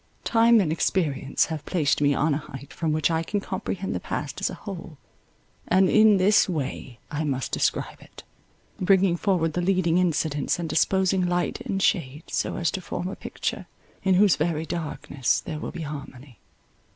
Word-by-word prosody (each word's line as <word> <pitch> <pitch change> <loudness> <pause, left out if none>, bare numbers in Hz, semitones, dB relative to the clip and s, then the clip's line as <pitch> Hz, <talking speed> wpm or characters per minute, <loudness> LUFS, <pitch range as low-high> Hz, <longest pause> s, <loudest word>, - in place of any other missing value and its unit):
Time 230 0 +5
and 175 -7 +1
experience 150 -5 0
have 155 -2 -5
placed 150 -4 0
me 145 -1 +4
on 145 +2 +1
an 140 - -1
height 140 -2 -10
from 165 -2 -1
which 155 +2 +1
I 160 0 +1
can 205 +5 -2
comprehend 195 -1 -4
the - - -2
past - - -5
as - - +1
a - - -6
whole; 175 -6 -8 0.7
and 185 +1 +4
in 215 -2 +6
this 200 +2 +4
way 135 -6 -4
I 150 +1 -2
must 135 -4 -2
describe - - -1
it, - - -14 0.6
bringing 190 -1 +3
forward 175 -4 0
the 175 - -1
leading 180 -2 +2
incidents, 155 -5 0
and 170 -1 -3
disposing 185 +3 +2
light 175 0 -1
and 195 - -2
shade 150 -5 0
so - - -1
as 170 - 0
to 190 - -4
form 180 0 -4
a 195 - -6
picture - - -4 0.3
in 190 -1 +3
whose 195 0 +5
very 160 0 -1
darkness 150 -5 -2
there 155 -3 -6
will - - -5
be 170 - -7
harmony. 140 -4 -9
170 Hz, 180 wpm, -25 LUFS, 150-190 Hz, 0.7 s, in